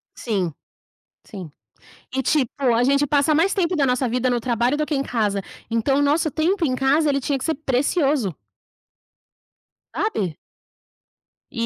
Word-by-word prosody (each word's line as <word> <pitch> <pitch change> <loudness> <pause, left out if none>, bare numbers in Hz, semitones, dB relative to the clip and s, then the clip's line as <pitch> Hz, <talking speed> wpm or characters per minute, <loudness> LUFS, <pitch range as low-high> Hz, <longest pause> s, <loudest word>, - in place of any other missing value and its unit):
Sim, 190 - -2 0.7
sim. 185 -6 -9 0.7
E 265 - +1
tipo, 265 -1 +1 0.2
a 235 - +2
gente 280 +3 +3
passa 290 +2 +2
mais 340 +6 +2
tempo 360 -2 0
da 290 -4 +2
nossa 255 0 +1
vida 250 +2 0
no 240 -1 +1
trabalho 240 +3 0
do 305 - 0
que 300 - -2
em 275 - 0
casa. 210 -6 -1 0.3
Então 230 +5 +1
o - - +2
nosso 305 +3 +2
tempo 335 +5 0
em 255 - 0
casa 285 +4 +2
ele 275 - +1
tinha 275 +1 -1
que 260 - -5
ser 320 - 0
precioso. 270 - 0 1.6
Sabe? 200 - -2 1.1
E 230 -2 -2
270 Hz, 160 wpm, -22 LUFS, 235-300 Hz, 1.6 s, gente